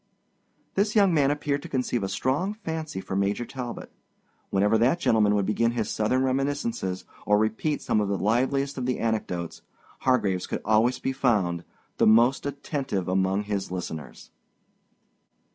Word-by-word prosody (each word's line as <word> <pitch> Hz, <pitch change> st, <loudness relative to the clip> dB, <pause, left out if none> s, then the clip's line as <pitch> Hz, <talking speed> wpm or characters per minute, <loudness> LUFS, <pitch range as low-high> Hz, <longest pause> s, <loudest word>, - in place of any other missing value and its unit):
This 205 Hz, +2 st, +1 dB
young 200 Hz, -4 st, +5 dB
man 145 Hz, -3 st, +3 dB
appeared 145 Hz, -1 st, -1 dB
to -, -, -9 dB
conceive 125 Hz, -3 st, -1 dB
a 95 Hz, -, -2 dB
strong 145 Hz, -, -1 dB
fancy 160 Hz, -, -5 dB
for 95 Hz, -, -5 dB
Major 100 Hz, +4 st, 0 dB
Talbot. 125 Hz, -2 st, -7 dB, 0.6 s
Whenever 100 Hz, +3 st, +2 dB
that 130 Hz, +9 st, +3 dB
gentleman 105 Hz, -8 st, +3 dB
would 100 Hz, -2 st, +1 dB
begin 115 Hz, +3 st, +1 dB
his 115 Hz, -3 st, -2 dB
Southern 125 Hz, +5 st, +1 dB
reminiscences, 130 Hz, -8 st, -1 dB, 0.2 s
or 105 Hz, 0 st, +3 dB
repeat 110 Hz, +8 st, 0 dB
some 105 Hz, -, +1 dB
of 105 Hz, -, 0 dB
the 100 Hz, -, 0 dB
liveliest 135 Hz, +6 st, 0 dB
of 125 Hz, -, -2 dB
the 130 Hz, -, 0 dB
anecdotes, 90 Hz, -7 st, -2 dB, 0.4 s
Hargraves 100 Hz, -8 st, +1 dB
could -, -, -4 dB
always 110 Hz, +4 st, +3 dB
be 135 Hz, -, -2 dB
found, 100 Hz, -10 st, +1 dB, 0.3 s
the -, -, +4 dB
most 120 Hz, +6 st, +4 dB
attentive 140 Hz, -, -3 dB
among 95 Hz, +2 st, +1 dB
his 100 Hz, -2 st, -3 dB
listeners. 85 Hz, -4 st, -7 dB
115 Hz, 155 wpm, -26 LUFS, 100-135 Hz, 0.6 s, young